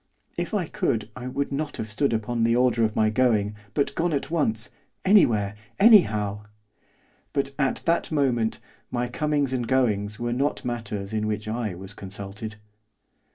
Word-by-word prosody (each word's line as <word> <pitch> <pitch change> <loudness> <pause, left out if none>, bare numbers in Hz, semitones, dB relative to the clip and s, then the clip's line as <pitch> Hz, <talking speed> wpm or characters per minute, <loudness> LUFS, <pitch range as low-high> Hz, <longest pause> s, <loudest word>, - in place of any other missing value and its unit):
If - - -3
I 190 -4 +1
could 120 - -1
I 125 0 -6
would 140 +2 -2
not 145 +1 -3
have 110 - -3
stood 125 +6 0
upon 115 +1 -1
the 115 +1 +3
order 120 -2 +3
of 110 -1 +1
my 110 0 +3
going, 110 -3 +2 0.2
but 140 - +1
gone 170 0 0
at 140 +1 -2
once, 115 -9 0 0.3
anywhere, 115 - +4 0.3
anyhow; 105 - +5 0.9
but, 140 -1 0
at 135 -2 +1
that 170 0 +1
moment, 125 -7 +1 0.3
my 120 0 -1
comings 145 +1 0
and 120 -2 -1
goings 110 -5 +1
were 120 0 -1
not 140 +4 -1
matters 110 -4 -4
in 110 0 0
which 105 0 -3
I 110 -4 -2
was 95 +2 -8
consulted. 100 +2 -7
120 Hz, 160 wpm, -25 LUFS, 105-140 Hz, 0.9 s, anyhow